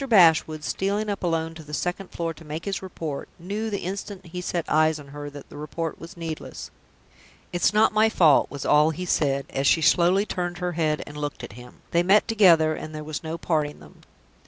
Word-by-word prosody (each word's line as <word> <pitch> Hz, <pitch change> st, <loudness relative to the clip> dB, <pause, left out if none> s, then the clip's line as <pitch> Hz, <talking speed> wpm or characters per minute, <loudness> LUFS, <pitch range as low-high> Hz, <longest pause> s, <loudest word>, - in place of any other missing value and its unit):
Bashwood, 160 Hz, -6 st, +5 dB
stealing 205 Hz, +5 st, -1 dB
up 200 Hz, -, -4 dB
alone 165 Hz, -2 st, -1 dB
to 160 Hz, -, -10 dB
the 150 Hz, 0 st, -5 dB
second 180 Hz, +5 st, -3 dB
floor 165 Hz, -1 st, -3 dB
to 165 Hz, -, -15 dB
make 155 Hz, +1 st, -6 dB
his 200 Hz, -1 st, -2 dB
report, 165 Hz, -6 st, -6 dB
knew, 205 Hz, +6 st, -4 dB
the 200 Hz, -2 st, -3 dB
instant 195 Hz, +1 st, -5 dB
he 180 Hz, +1 st, -6 dB
set 175 Hz, -2 st, -2 dB
eyes 155 Hz, 0 st, +3 dB
on 140 Hz, -1 st, -12 dB
her, 145 Hz, +1 st, -7 dB
that 145 Hz, -1 st, -11 dB
the -, -, -11 dB
report 160 Hz, +2 st, -4 dB
was 170 Hz, +3 st, -11 dB
needless. 165 Hz, -2 st, -6 dB, 0.8 s
"It's 175 Hz, -, +3 dB
not 215 Hz, +1 st, +4 dB
my 215 Hz, +1 st, +4 dB
fault," 160 Hz, -9 st, +4 dB
was 140 Hz, -1 st, -6 dB
all 150 Hz, +1 st, +5 dB
he 180 Hz, +3 st, -4 dB
said, 140 Hz, -5 st, +1 dB
as 135 Hz, +1 st, 0 dB
she 160 Hz, -, +4 dB
slowly 180 Hz, +5 st, +4 dB
turned 175 Hz, -3 st, -3 dB
her 180 Hz, -1 st, -2 dB
head 155 Hz, -2 st, 0 dB
and 145 Hz, -, -10 dB
looked 145 Hz, -4 st, -4 dB
at 120 Hz, -, -8 dB
him. 125 Hz, +2 st, -13 dB
"They 170 Hz, -, +3 dB
met 195 Hz, +4 st, +4 dB
together, 175 Hz, -8 st, +5 dB
and 155 Hz, 0 st, -7 dB
there 155 Hz, -, -5 dB
was 150 Hz, -1 st, -5 dB
no 160 Hz, +1 st, -4 dB
parting 155 Hz, -3 st, -1 dB
them." -, -, -16 dB
165 Hz, 215 wpm, -25 LUFS, 150-185 Hz, 0.8 s, Bashwood